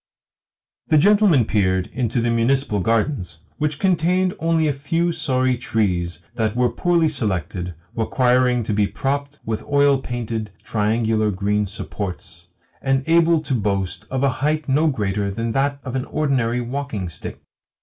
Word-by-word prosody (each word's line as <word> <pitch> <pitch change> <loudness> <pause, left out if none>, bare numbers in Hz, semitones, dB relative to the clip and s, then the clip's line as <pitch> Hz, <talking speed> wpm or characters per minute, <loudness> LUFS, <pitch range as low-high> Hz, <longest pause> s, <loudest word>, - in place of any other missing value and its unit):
The 155 - +4
gentleman 195 - +5
peered 95 -4 +1
also - - -25
into 120 -1 +1
the 120 0 +1
municipal 115 -1 +1
gardens, 110 - 0 0.2
which 150 -1 0
contained 180 +1 +2
only 165 -1 +2
a 145 - +1
few 165 +5 0
sorry 130 -6 +1
trees 90 -7 -1
that 110 -2 -1
were 125 -1 +2
poorly 170 -2 +2
selected, 95 - -2 0.2
requiring 125 +1 +2
to 105 - -2
be 100 0 +2
propped 140 +7 -3
with 110 -1 -2
oil 140 -1 +3
painted, 115 -4 -4
triangular 110 -1 +1
green 105 +1 0
supports, 90 -3 -7 0.3
and 135 0 +1
able 165 0 +4
to 140 -3 -3
boast 100 -5 -2
of 130 +1 -1
a 140 - +4
height 155 +1 0
no 145 +4 +3
greater 105 -7 -1
than 115 +4 -2
that 140 +3 0
of 130 -1 -5
an 130 - -1
ordinary 125 -5 0
walking 120 -6 -4
stick. 85 - -7
125 Hz, 150 wpm, -21 LUFS, 105-145 Hz, 0.3 s, gentleman